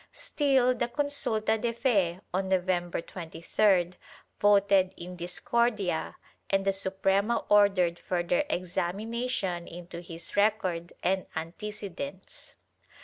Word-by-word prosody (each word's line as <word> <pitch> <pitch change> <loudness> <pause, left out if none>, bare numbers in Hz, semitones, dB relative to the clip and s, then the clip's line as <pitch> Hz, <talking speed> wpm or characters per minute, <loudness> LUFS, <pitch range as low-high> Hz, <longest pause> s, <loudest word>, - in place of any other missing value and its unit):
Still 265 -4 +2
the 240 -1 -1
consulta 235 -5 0
de 235 -1 0
fe, 195 -8 +1
on 190 +1 -1
November 180 -2 0
23d, 175 +2 +1 0.5
voted 200 -2 +4
in 180 +1 -8
discordia 200 - -1 0.3
and 195 0 +1
the 195 - +3
Suprema 195 +3 +1
ordered 195 -4 +4
further 175 -1 0
examination 190 +2 -2
into 170 0 -8
his 170 -1 -8
record 190 -5 +1
and 190 0 +1
antecedents. 200 - -7
195 Hz, 100 wpm, -29 LUFS, 175-215 Hz, 0.5 s, voted